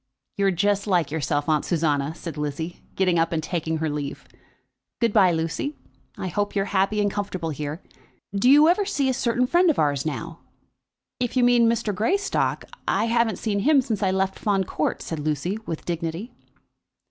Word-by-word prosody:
"You're 200 Hz, -1 st, +2 dB
just 200 Hz, +3 st, +1 dB
like 175 Hz, -7 st, +1 dB
yourself, 145 Hz, -1 st, -1 dB
Aunt 155 Hz, -2 st, +2 dB
Susanna," 155 Hz, -3 st, 0 dB
said 165 Hz, -3 st, -7 dB
Lizzie, 150 Hz, +3 st, -4 dB
getting 180 Hz, -3 st, +2 dB
up 165 Hz, 0 st, +1 dB
and 160 Hz, -2 st, -1 dB
taking 160 Hz, -1 st, -2 dB
her 160 Hz, 0 st, -1 dB
leave. 145 Hz, -2 st, -5 dB, 0.7 s
"Good 230 Hz, -3 st, +1 dB
bye, 190 Hz, -5 st, +5 dB
Lucy, 165 Hz, -, -2 dB, 0.4 s
I -, -, -4 dB
hope 205 Hz, +4 st, -2 dB
you're 195 Hz, -1 st, +1 dB
happy 195 Hz, +2 st, +2 dB
and 205 Hz, -1 st, +1 dB
comfortable 185 Hz, -5 st, -3 dB
here. 150 Hz, +3 st, -5 dB, 0.5 s
Do 200 Hz, +5 st, +3 dB
you 295 Hz, +3 st, +7 dB
ever 360 Hz, +5 st, +3 dB
see 285 Hz, -9 st, 0 dB
a -, -, +2 dB
certain 245 Hz, 0 st, +1 dB
friend 350 Hz, +6 st, +4 dB
of 310 Hz, -, +2 dB
ours 145 Hz, -2 st, +1 dB
now?" 155 Hz, +2 st, -5 dB, 0.8 s
"If 245 Hz, +1 st, -1 dB
you 250 Hz, -, +4 dB
mean 240 Hz, -1 st, +5 dB
Mr. 225 Hz, -2 st, 0 dB
Greystock, 385 Hz, -, 0 dB, 0.2 s
I 200 Hz, +4 st, +2 dB
haven't 230 Hz, -1 st, +1 dB
seen 205 Hz, -3 st, -1 dB
him 290 Hz, +7 st, +4 dB
since 230 Hz, -6 st, -2 dB
I 195 Hz, -, +2 dB
left 190 Hz, 0 st, 0 dB
Fawn 200 Hz, -2 st, +1 dB
Court," 155 Hz, -4 st, -2 dB
said 160 Hz, -, -4 dB
Lucy, 155 Hz, +7 st, -2 dB
with 160 Hz, -, -5 dB
dignity. 170 Hz, +6 st, -4 dB
190 Hz, 180 wpm, -24 LUFS, 160-225 Hz, 0.8 s, you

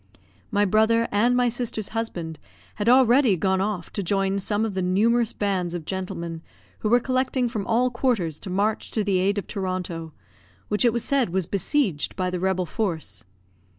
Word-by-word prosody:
My 205 Hz, +1 st, +2 dB
brother 220 Hz, +3 st, +3 dB
and 235 Hz, +5 st, +3 dB
my 250 Hz, 0 st, +3 dB
sister's 230 Hz, -3 st, -2 dB
husband 175 Hz, -9 st, -4 dB, 0.4 s
had 210 Hz, +2 st, +1 dB
already 250 Hz, -4 st, +5 dB
gone 190 Hz, +2 st, +1 dB
off 195 Hz, -4 st, -3 dB
to 205 Hz, -, -2 dB
join 195 Hz, +1 st, 0 dB
some 205 Hz, +3 st, 0 dB
of 215 Hz, -, -3 dB
the 190 Hz, -, -1 dB
numerous 220 Hz, +6 st, +2 dB
bands 185 Hz, -4 st, -1 dB
of 165 Hz, -3 st, -5 dB
gentlemen 170 Hz, -3 st, -4 dB, 0.4 s
who 215 Hz, -, -1 dB
were 240 Hz, +2 st, +5 dB
collecting 255 Hz, 0 st, 0 dB
from 220 Hz, -4 st, -4 dB
all 245 Hz, +2 st, +2 dB
quarters 230 Hz, -, 0 dB
to 195 Hz, -, -7 dB
march 205 Hz, +4 st, 0 dB
to 215 Hz, -, +1 dB
the 195 Hz, -2 st, +1 dB
aid 200 Hz, +2 st, +1 dB
of 200 Hz, -, -2 dB
Toronto, 180 Hz, -4 st, -4 dB, 0.6 s
which 210 Hz, +4 st, +2 dB
it 240 Hz, -, +5 dB
was 235 Hz, 0 st, -2 dB
said 275 Hz, -7 st, +1 dB
was 185 Hz, 0 st, -1 dB
besieged 200 Hz, -, 0 dB
by 185 Hz, -1 st, -1 dB
the 180 Hz, -, -2 dB
rebel 185 Hz, 0 st, 0 dB
force. 160 Hz, -, -3 dB
205 Hz, 185 wpm, -24 LUFS, 185-230 Hz, 0.6 s, already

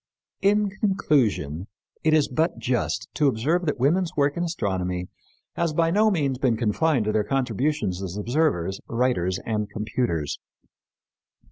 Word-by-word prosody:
In 205 Hz, 0 st, +3 dB
conclusion, 130 Hz, -, 0 dB, 0.4 s
it 155 Hz, 0 st, +4 dB
is 150 Hz, -2 st, +3 dB
but 160 Hz, +6 st, 0 dB
just 115 Hz, -3 st, -1 dB
to 150 Hz, -, +2 dB
observe 155 Hz, +9 st, +1 dB
that 145 Hz, -, -1 dB
women's 165 Hz, +7 st, +1 dB
work 140 Hz, 0 st, +2 dB
in 175 Hz, -, -1 dB
astronomy 95 Hz, -, -2 dB, 0.5 s
has 170 Hz, -2 st, 0 dB
by 165 Hz, +1 st, +2 dB
no 215 Hz, +4 st, +4 dB
means 140 Hz, -9 st, 0 dB
been 125 Hz, -4 st, +2 dB
confined 120 Hz, +3 st, +1 dB
to 105 Hz, -, +1 dB
their 105 Hz, -1 st, +1 dB
contributions 130 Hz, -4 st, -1 dB
as 95 Hz, 0 st, -5 dB
observers, 105 Hz, -, 0 dB
writers 115 Hz, -7 st, 0 dB
and 105 Hz, -2 st, -1 dB
computers. 105 Hz, -, -2 dB
130 Hz, 140 wpm, -25 LUFS, 105-160 Hz, 0.5 s, it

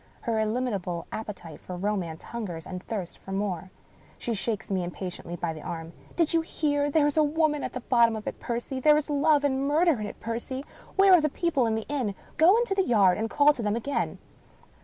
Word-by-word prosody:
Her 230 Hz, -2 st, 0 dB
illimitable 215 Hz, -6 st, -1 dB
appetite 195 Hz, -8 st, -7 dB
for 180 Hz, -, -7 dB
romance 180 Hz, -4 st, -2 dB
hungers 185 Hz, -9 st, -5 dB
and 180 Hz, -1 st, -6 dB
thirsts 195 Hz, -4 st, -5 dB
for 195 Hz, -, -11 dB
more. 195 Hz, -2 st, -2 dB, 0.5 s
She 235 Hz, -, -2 dB
shakes 215 Hz, -1 st, -2 dB
me 185 Hz, -2 st, +1 dB
impatiently 175 Hz, -1 st, -6 dB
by 170 Hz, -1 st, -2 dB
the 155 Hz, -, -9 dB
arm. 165 Hz, +1 st, -6 dB
" -, -, -22 dB
Do 335 Hz, -, +4 dB
you 330 Hz, +1 st, +2 dB
hear? 290 Hz, -3 st, 0 dB
There 295 Hz, 0 st, +3 dB
is 295 Hz, +1 st, 0 dB
a 310 Hz, -, +6 dB
woman 300 Hz, -1 st, +1 dB
at -, -, -4 dB
the 255 Hz, -, -4 dB
bottom 235 Hz, -2 st, +4 dB
of 215 Hz, -, -6 dB
it, -, -, -5 dB
Percy! 240 Hz, +2 st, -3 dB
There 300 Hz, +3 st, +5 dB
is 300 Hz, 0 st, -2 dB
love 290 Hz, 0 st, +3 dB
and 275 Hz, -1 st, +1 dB
murder 310 Hz, -2 st, +3 dB
in 210 Hz, -, -3 dB
it, -, -, -9 dB
Percy! 240 Hz, +4 st, -4 dB, 0.3 s
Where 390 Hz, -1 st, +6 dB
are 355 Hz, -, +7 dB
the 305 Hz, -, +1 dB
people 280 Hz, -6 st, +1 dB
of 220 Hz, -, +1 dB
the 220 Hz, -, -2 dB
inn? 255 Hz, -9 st, -2 dB, 0.2 s
Go 345 Hz, +7 st, +6 dB
into 470 Hz, -4 st, +1 dB
the 390 Hz, -, +2 dB
yard, 205 Hz, -, +4 dB
and 225 Hz, +1 st, -1 dB
call 295 Hz, +4 st, +5 dB
to 255 Hz, -, -6 dB
them 210 Hz, -1 st, 0 dB
again." 275 Hz, +5 st, -2 dB
235 Hz, 220 wpm, -27 LUFS, 195-295 Hz, 0.5 s, are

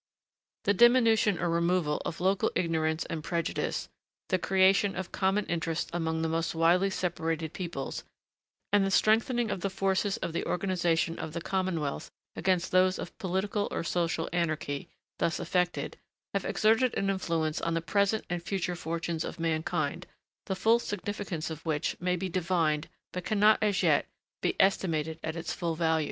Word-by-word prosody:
The 200 Hz, -, +3 dB
diminution 230 Hz, -3 st, +5 dB
or 175 Hz, -, -1 dB
removal 170 Hz, -2 st, +1 dB
of 165 Hz, -, -4 dB
local 190 Hz, +2 st, +2 dB
ignorance 160 Hz, -2 st, 0 dB
and 160 Hz, -2 st, -5 dB
prejudice, 170 Hz, 0 st, -2 dB, 0.4 s
the 185 Hz, -, +2 dB
creation 195 Hz, +2 st, +3 dB
of 190 Hz, -, -5 dB
common 195 Hz, +2 st, +1 dB
interests 165 Hz, -1 st, -2 dB
among 160 Hz, -1 st, -1 dB
the -, -, +1 dB
most 165 Hz, +1 st, -1 dB
widely 175 Hz, +4 st, +4 dB
separated 165 Hz, -4 st, -2 dB
peoples, 170 Hz, -7 st, -4 dB, 0.7 s
and 205 Hz, -1 st, +5 dB
the 195 Hz, -, +1 dB
strengthening 225 Hz, +3 st, +3 dB
of 180 Hz, -, -3 dB
the 195 Hz, -, 0 dB
forces 195 Hz, +1 st, 0 dB
of 165 Hz, -, -4 dB
the 170 Hz, -, -1 dB
organisation 175 Hz, -3 st, 0 dB
of 160 Hz, -1 st, -5 dB
the 170 Hz, -, -2 dB
commonwealth 170 Hz, -5 st, -2 dB, 0.3 s
against 185 Hz, -2 st, +1 dB
those 185 Hz, 0 st, +4 dB
of -, -, -7 dB
political 200 Hz, +1 st, -1 dB
or -, -, -3 dB
social 165 Hz, -1 st, 0 dB
anarchy, 155 Hz, -5 st, -1 dB, 0.3 s
thus 165 Hz, -, 0 dB
effected, 180 Hz, +1 st, -1 dB, 0.4 s
have -, -, -1 dB
exerted 225 Hz, +3 st, +3 dB
an 195 Hz, 0 st, +1 dB
influence 165 Hz, -5 st, -1 dB
on 165 Hz, 0 st, 0 dB
the -, -, +2 dB
present 200 Hz, +6 st, +1 dB
and 175 Hz, 0 st, -2 dB
future 180 Hz, 0 st, -2 dB
fortunes 165 Hz, -1 st, -3 dB
of -, -, -6 dB
mankind 160 Hz, -1 st, -1 dB, 0.4 s
the 190 Hz, -, -1 dB
full 225 Hz, +4 st, +4 dB
significance 205 Hz, -6 st, -4 dB
of 160 Hz, 0 st, -7 dB
which 155 Hz, -3 st, -1 dB
may 180 Hz, 0 st, +1 dB
be 185 Hz, +2 st, -3 dB
divined, 170 Hz, -4 st, 0 dB, 0.2 s
but 180 Hz, -, -4 dB
cannot, 210 Hz, +2 st, +4 dB
as 205 Hz, -3 st, +2 dB
yet, -, -, +3 dB, 0.3 s
be -, -, 0 dB
estimated 160 Hz, -5 st, +1 dB
at 160 Hz, 0 st, -3 dB
its 165 Hz, 0 st, -3 dB
full 170 Hz, -2 st, -2 dB
value. 160 Hz, -1 st, +2 dB
175 Hz, 165 wpm, -29 LUFS, 165-195 Hz, 0.7 s, diminution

